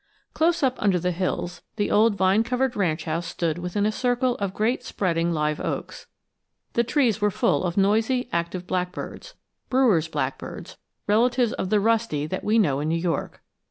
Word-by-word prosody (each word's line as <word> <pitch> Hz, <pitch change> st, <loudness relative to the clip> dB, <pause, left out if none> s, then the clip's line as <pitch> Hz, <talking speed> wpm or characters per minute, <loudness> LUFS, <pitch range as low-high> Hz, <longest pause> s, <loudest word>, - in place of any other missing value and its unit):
CLOSE 335 Hz, 0 st, +2 dB
up 260 Hz, -1 st, +1 dB
under 195 Hz, -3 st, +3 dB
the 180 Hz, +1 st, 0 dB
hills, 180 Hz, 0 st, -3 dB
the 205 Hz, -, -1 dB
old 215 Hz, 0 st, +4 dB
vine 190 Hz, +2 st, +3 dB
covered 250 Hz, +1 st, -1 dB
ranch 170 Hz, -6 st, 0 dB
house 165 Hz, +2 st, -2 dB
stood 165 Hz, -1 st, -2 dB
within 180 Hz, +4 st, -1 dB
a 215 Hz, -, +2 dB
circle 245 Hz, +2 st, +1 dB
of 200 Hz, -2 st, -2 dB
great 220 Hz, +6 st, 0 dB
spreading 170 Hz, -3 st, -1 dB
live 150 Hz, -2 st, 0 dB
oaks. -, -, -5 dB, 0.7 s
The 235 Hz, -, +2 dB
trees 240 Hz, -3 st, +1 dB
were 210 Hz, -, +3 dB
full 190 Hz, -, +1 dB
of 175 Hz, 0 st, -2 dB
noisy, 220 Hz, +6 st, +2 dB
active 170 Hz, +1 st, -2 dB
blackbirds 180 Hz, -, -4 dB, 0.3 s
Brewer's 235 Hz, -12 st, +3 dB
blackbirds, 145 Hz, -4 st, -5 dB, 0.3 s
relatives 235 Hz, +3 st, +2 dB
of 185 Hz, -, -3 dB
the 210 Hz, -, +3 dB
rusty 220 Hz, -9 st, +1 dB
that 185 Hz, +5 st, -4 dB
we 215 Hz, +2 st, +2 dB
know 145 Hz, -11 st, +2 dB
in 150 Hz, -, -2 dB
New 165 Hz, -, +1 dB
York. 165 Hz, 0 st, -3 dB
200 Hz, 175 wpm, -24 LUFS, 170-230 Hz, 0.7 s, old